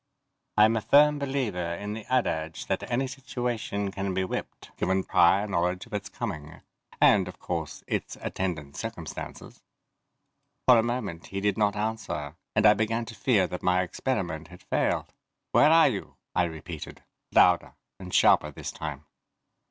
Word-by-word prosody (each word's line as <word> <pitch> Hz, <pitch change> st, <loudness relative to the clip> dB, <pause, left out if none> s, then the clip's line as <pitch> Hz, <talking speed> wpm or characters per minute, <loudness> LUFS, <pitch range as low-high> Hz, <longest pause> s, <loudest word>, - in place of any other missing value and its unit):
I'm 110 Hz, +2 st, +6 dB
a 110 Hz, -, 0 dB
firm 150 Hz, +4 st, +5 dB
believer 110 Hz, -12 st, -2 dB
in 105 Hz, +4 st, -5 dB
the 110 Hz, +2 st, -8 dB
adage 80 Hz, -11 st, 0 dB
that -, -, -2 dB
any 125 Hz, +2 st, +1 dB
situation 120 Hz, -6 st, -3 dB
can 95 Hz, -1 st, -3 dB
be 95 Hz, -, +1 dB
whipped, 95 Hz, -, -6 dB
given 95 Hz, +1 st, 0 dB
prior 95 Hz, +4 st, +4 dB
knowledge 90 Hz, -2 st, -1 dB
of 115 Hz, -, -17 dB
its 105 Hz, -, -3 dB
coming 75 Hz, -1 st, -6 dB, 0.4 s
and, -, -, +5 dB
of -, -, -9 dB
course, 80 Hz, -4 st, -4 dB
its -, -, -3 dB
attendant 75 Hz, -7 st, -4 dB
circumstances. -, -, -7 dB, 1.1 s
For 125 Hz, -2 st, +8 dB
a -, -, +5 dB
moment 110 Hz, -8 st, -3 dB
he 95 Hz, -, -4 dB
did 100 Hz, +1 st, +1 dB
not 105 Hz, -2 st, +1 dB
answer 105 Hz, -9 st, -3 dB, 0.2 s
and 105 Hz, 0 st, +3 dB
I 105 Hz, -, +9 dB
began 110 Hz, +2 st, -1 dB
to 115 Hz, -, -9 dB
fear 100 Hz, -1 st, +3 dB
that 90 Hz, 0 st, -5 dB
my 90 Hz, 0 st, +2 dB
experiment 90 Hz, -, -3 dB
had 90 Hz, 0 st, -14 dB
failed. -, -, -1 dB, 0.4 s
"Where 150 Hz, -, +6 dB
are 165 Hz, -2 st, +7 dB
you?" 105 Hz, -6 st, -5 dB, 0.2 s
I 90 Hz, -, +3 dB
repeated, 80 Hz, -3 st, -8 dB, 0.3 s
louder -, -, +4 dB, 0.2 s
and 90 Hz, -1 st, -8 dB
sharper -, -, +5 dB
this -, -, -6 dB
time. 75 Hz, -1 st, -6 dB
100 Hz, 160 wpm, -27 LUFS, 90-115 Hz, 1.1 s, I